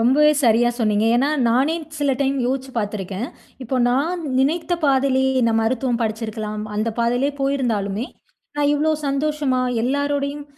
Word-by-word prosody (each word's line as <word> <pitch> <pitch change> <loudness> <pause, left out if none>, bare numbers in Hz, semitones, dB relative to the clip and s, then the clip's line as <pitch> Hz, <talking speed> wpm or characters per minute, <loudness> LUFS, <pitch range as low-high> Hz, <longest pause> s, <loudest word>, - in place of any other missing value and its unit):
ரொம்பவே 295 +6 +5
சரியா 240 +1 +4
சொன்னீங்க. 215 -2 +1
ஏனா, 270 +4 +2 0.2
நானே 265 +7 +2 0.2
சில 285 -1 +1
டைம் 275 0 +1
யோச்சி 265 0 -2
பார்த்துருக்கன். 205 +1 -4 0.3
இப்போ 255 +2 -2
நான் 320 +8 0 0.2
நினைத்த 320 +5 0
பாதையிலேயே 265 -1 +2
இந்த 230 -1 +2
மருத்துவம் 245 +1 0
படிச்சிருக்கலாம். 215 -1 -4
அந்த 215 +2 0
பாதையிலேயே 245 +4 +1
போயிருந்தாலுமே, 240 -6 -1 0.5
நான் 290 0 +2
இவ்ளோ 305 +2 +1 0.2
சந்தோஷமா, 280 -2 0 0.2
எல்லாருடையும் 285 +2 -1
260 Hz, 130 wpm, -21 LUFS, 230-285 Hz, 0.5 s, ரொம்பவே